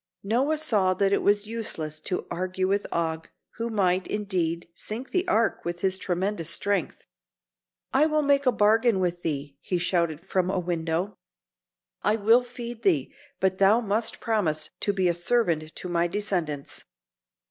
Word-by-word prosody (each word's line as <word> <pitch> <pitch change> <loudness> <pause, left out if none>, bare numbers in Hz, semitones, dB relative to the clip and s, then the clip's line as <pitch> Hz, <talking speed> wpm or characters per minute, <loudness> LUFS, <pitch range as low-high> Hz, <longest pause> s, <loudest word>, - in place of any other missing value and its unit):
Noah 255 +9 +1
saw 205 -12 +2
that 195 +1 +2
it - - +2
was 205 +1 +2
useless 160 -9 -3
to 180 - -2
argue 185 +1 -1
with 200 +1 0
Og, 160 -1 -2 0.3
who 230 +1 -2
might, 190 -4 +1
indeed, 180 -5 -1
sink 230 +9 -6
the 365 0 0
Ark 225 +1 +1
with 175 0 -4
his 190 0 +1
tremendous 185 -1 -1
strength. 200 +3 -1 0.9
"I 285 +4 +5
will 305 -1 +1
make 280 -1 +3
a - - +6
bargain 220 0 +3
with 175 -1 -1
thee," 145 -3 -3
he 180 - -1
shouted 170 -2 0
from 185 -1 0
a 190 - 0
window. 175 +2 -2 0.8
"I 210 - +2
will 225 +3 +5
feed 240 -1 -7
thee, 160 - +1 0.3
but 190 0 +1
thou 200 +4 +6
must 220 0 -1
promise 180 -9 0
to 205 - +1
be 190 -2 +1
a 175 - +3
servant 170 -4 0
to - - -5
my 175 -1 +1
descendants." 175 -7 -3
190 Hz, 160 wpm, -26 LUFS, 170-220 Hz, 0.9 s, a